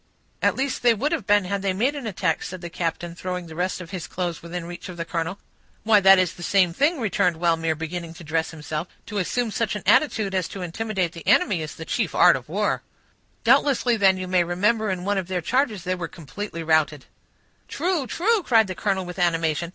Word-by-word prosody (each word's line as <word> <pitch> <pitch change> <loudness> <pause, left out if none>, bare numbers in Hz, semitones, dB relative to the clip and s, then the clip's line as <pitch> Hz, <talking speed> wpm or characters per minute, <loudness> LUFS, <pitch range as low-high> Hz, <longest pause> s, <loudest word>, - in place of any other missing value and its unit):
"At - - +3
least 270 0 -2
they 240 -2 +4
would 280 +8 -1
have 310 - -2
been, 205 -1 +4
had 200 +2 -2
they 195 -1 0
made 240 +9 +1
an 280 -5 -5
attack," 185 -5 -1
said 185 -1 -6
the 170 -1 -7
captain, 170 0 -3
throwing 180 +1 -4
the 160 - -10
rest 180 +3 -2
of 180 -1 -9
his 180 -4 -5
clothes 175 -2 -3
within 170 0 -6
reach 175 +1 -8
of 180 - -8
the 165 - -3
colonel. 170 +3 -3 0.5
"Why, 215 -1 +5
that 195 0 +7
is 185 -2 +1
the - - -13
same 180 -1 +3
thing," 290 - +2
returned 200 -6 +1
Wellmere, 165 -1 +1
beginning 165 +1 -5
to 170 - -11
dress 160 +1 -1
himself. 155 +1 -5 0.2
"To 210 -2 -3
assume 230 +5 -1
such 220 -1 -1
an 210 - -5
attitude 215 -10 +3
as 185 -3 0
to 195 - -7
intimidate 185 -1 -2
your 170 - -8
enemy, 180 -6 +3
is 155 -1 -6
the 160 - -8
chief - - -1
art - - +7
of - - -7
war." - - 0 0.6
"Doubtless, 270 +2 +4
then, 200 -6 +3
you 185 0 -4
may 180 -1 +3
remember 210 +6 +1
in 185 -1 -3
one 200 0 +1
of 185 - -5
their 185 -1 -1
charges 225 - 0
they 185 - -1
were 180 -2 -4
completely 170 +3 -7
routed." 155 -3 +1 0.6
"True—true," 360 - 0
cried 230 -9 +4
the 190 - -5
colonel, 190 -1 -1
with 180 +1 -7
animation. 165 -1 +1
185 Hz, 220 wpm, -24 LUFS, 170-215 Hz, 0.6 s, that